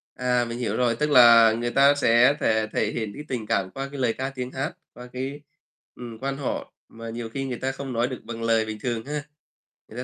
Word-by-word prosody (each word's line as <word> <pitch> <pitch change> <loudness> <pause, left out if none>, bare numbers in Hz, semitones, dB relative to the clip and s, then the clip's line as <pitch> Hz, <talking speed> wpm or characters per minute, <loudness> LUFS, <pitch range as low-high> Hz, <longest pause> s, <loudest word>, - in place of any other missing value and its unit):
À, 125 -1 +1
mình 115 0 -6
hiểu 125 - -2
rồi. 120 -2 +1
Tức 150 +4 -1
là 115 -4 +8
người 120 +1 -2
ta 140 +2 +5
sẽ 125 0 +4
thể 110 0 +1
thể 105 - 0
hiện 110 -3 -4
cái 150 - -8
tình 120 -5 -4
cảm 95 -2 0
qua 135 0 -5
cái 140 - -6
lời 125 -3 +2
ca 130 +3 -4
tiếng 130 -1 -6
hát, 135 +2 -3 0.2
qua 125 0 -10
cái 135 +3 -5 0.5
ừm, 120 -2 -9
Quan 135 +3 -3
họ 140 -2 -4 0.2
mà 115 0 -9
nhiều 115 0 -5
khi 135 +4 -4
người 125 -2 -4
ta 135 0 -2
không 135 -1 -6
nói 120 +1 0
được 130 -2 -7
bằng 115 -1 -7
lời 115 -1 +2
bình 110 -1 -6
thường 115 -2 -2
ha, 150 +1 -4 0.7
người 115 - -10
125 Hz, 240 wpm, -25 LUFS, 115-135 Hz, 0.7 s, là